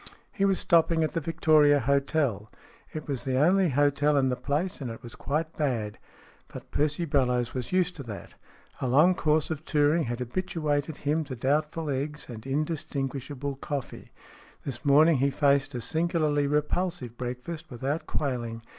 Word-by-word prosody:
He 195 - 0
was 195 -1 +3
stopping 165 -1 +3
at 155 - -1
the 165 - -1
Victoria 155 -2 +4
Hotel. 135 -5 0 0.4
It 155 -1 -6
was 140 -4 -2
the 130 -1 0
only 180 +5 +4
hotel 145 +1 +2
in 135 -1 +3
the 125 - 0
place, 145 +7 -2
and 130 - -3
it 115 +1 -8
was 120 - -9
quite 155 +3 -3
bad. 115 -8 -2 0.5
But - - -11
Percy 150 +3 0
Bellowes 125 -5 +1
was 125 -2 -4
used 180 -1 +1
to 140 - -6
that. 105 -3 -8 0.5
A 130 - 0
long 150 +9 +5
course 155 -2 +1
of 155 -1 -4
touring 150 +1 +2
had 120 0 -3
habituated 150 +2 -2
him 150 +2 0
to 130 - -6
doubtful 150 +4 0
eggs 145 +2 -3
and 115 0 -8
indistinguishable 140 -2 -3
coffee. 140 -1 -6 0.5
This 125 -4 -5
morning 150 +2 +5
he 135 +2 +2
faced 140 0 +2
a 120 - -3
singularly 155 +1 +1
repulsive 150 -3 -1
breakfast 125 +7 -6
without 135 +5 -3
quailing. 120 -5 -3
145 Hz, 165 wpm, -27 LUFS, 130-155 Hz, 0.5 s, long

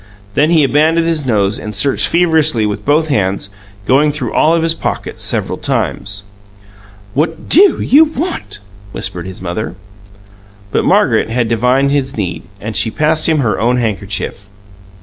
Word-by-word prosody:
Then 150 +7 +2
he 165 -3 +4
abandoned 155 +4 +2
his 160 -4 -1
nose 105 -3 +1
and 105 -1 -7
searched 135 +8 +2
feverishly 160 -9 +2
with 105 0 -3
both 155 +2 +2
hands, 100 -6 -1 0.3
going 145 +5 +3
through 135 -6 -4
all 160 +2 +3
of 165 - 0
his 165 0 +2
pockets - - -5
several - - -2
times. 100 0 -2 0.9
"What 160 +4 -2
DO 385 +5 +5
you 300 +5 +5
want?" 320 - -4 0.4
whispered 90 0 -3
his 95 0 -9
mother. 90 +2 -4 1.0
But - - 0
Margaret - - +2
had 120 0 0
divined 125 +4 +2
his 140 -2 -1
need, 90 -5 -3 0.2
and 110 +1 -6
she 115 - +1
passed 155 +5 +1
him 155 -2 +2
her 105 -7 0
own 120 +2 +1
handkerchief. 100 -3 -3
135 Hz, 155 wpm, -14 LUFS, 105-160 Hz, 1.0 s, DO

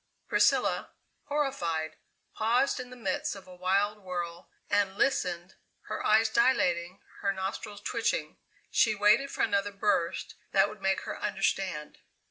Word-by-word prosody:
Priscilla, - - +2 0.4
horrified, 175 - -1 0.4
paused 245 +5 +2
in 250 -1 -6
the 250 - -10
midst 205 -4 -2
of 195 - -11
a 185 - -12
wild 195 +4 +1
whirl 175 -2 -5 0.2
and 200 -1 +1
listened, 180 -9 0 0.3
her 215 - -5
eyes 220 +1 +5
dilating, 185 -7 +2 0.2
her 200 - +1
nostrils 200 +2 -5
twitching. 235 - -1 0.3
She 220 -3 +4
waited 210 +7 +4
for - - -1
another 205 -1 +1
burst 200 -4 0 0.2
that 195 0 +5
would 210 -2 -11
make 195 0 +1
her - - -6
understand. 190 -6 -1
200 Hz, 135 wpm, -29 LUFS, 185-220 Hz, 0.4 s, eyes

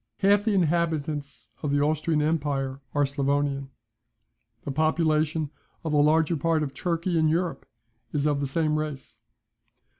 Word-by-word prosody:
Half 205 +1 +4
the 215 -3 +2
inhabitants 150 -8 -1
of 150 - -2
the 145 0 +2
Austrian 155 +1 +1
empire 140 -3 -1
are 145 - +3
Sclavonian. 140 0 -1 1.0
The 140 - -2
population 155 0 +1 0.3
of 160 - -2
the 150 - +3
larger 160 +2 +3
part 160 +1 +1
of 135 -2 -4
Turkey 170 0 -1
in 155 - +3
Europe 165 -3 -1 0.4
is 145 -1 -1
of 145 -2 +2
the 140 - -1
same 155 +1 +1
race. 150 -3 -6
150 Hz, 145 wpm, -26 LUFS, 140-165 Hz, 1.0 s, Half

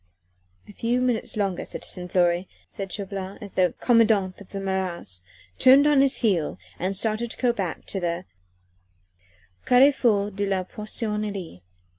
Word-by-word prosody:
"A - - -11
few 235 +4 0
minutes 250 -4 -1
longer, 195 -3 -1
citizen 180 0 -6
Fleury," 175 0 +2 0.2
said 195 -2 -6
Chauvelin, 195 -1 -5
as 205 -2 -9
the 180 -1 +2
commandant 215 -6 +3
of 200 - -13
the 195 - -5
Marats 185 - -3 0.4
turned 270 +3 +7
on 295 -2 +5
his 275 -1 +3
heel 180 -8 +1 0.2
and 190 +2 -1
started 220 +3 0
to - - -8
go 245 -2 +2
back 190 -7 -4
to 195 - -3
the 175 0 -2 1.4
Carrefour 245 -6 +4
de 200 +1 -2
la 190 -1 0
Poissonnerie. 210 - -4
200 Hz, 145 wpm, -25 LUFS, 185-230 Hz, 1.4 s, turned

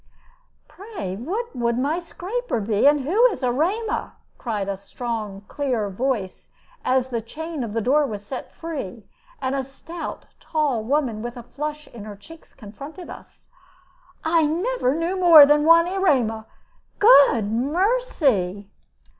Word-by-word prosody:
"Pray 380 - -7
what 375 - -4
would 235 -1 0
my 290 +7 0
scraper 375 - -4
be? 210 +4 +2
and 290 0 +4
who 400 - +4
is 420 - -5
Erema?" 345 - -1 0.3
cried 210 -5 -3
a 200 - -2
strong, 205 0 -6
clear 245 -8 -2
voice, 220 -3 -3 0.3
as 260 0 +1
the 235 -2 -2
chain 315 +5 -6
of 220 -3 -5
the 225 - 0
door 280 +6 +3
was 205 -3 -7
set 255 +3 -7
free, 270 - -7 0.4
and 260 0 0
a 275 -1 -1
stout, 325 +6 -8
tall 290 -8 -1
woman 250 -3 0
with 240 +2 -6
a 240 - -8
flush 300 +4 -6
in 220 -3 -10
her 210 -1 -8
cheeks 320 +11 -16
confronted 275 - -10
us. - - -14 0.8
"I 320 -1 +3
never 345 - 0
knew 340 +4 -1
more 335 -5 +9
than 295 +1 +3
one 335 +1 +7
Erema 260 - +1 0.5
Good 280 - +6
mercy!" 265 - 0
275 Hz, 145 wpm, -23 LUFS, 225-330 Hz, 0.8 s, more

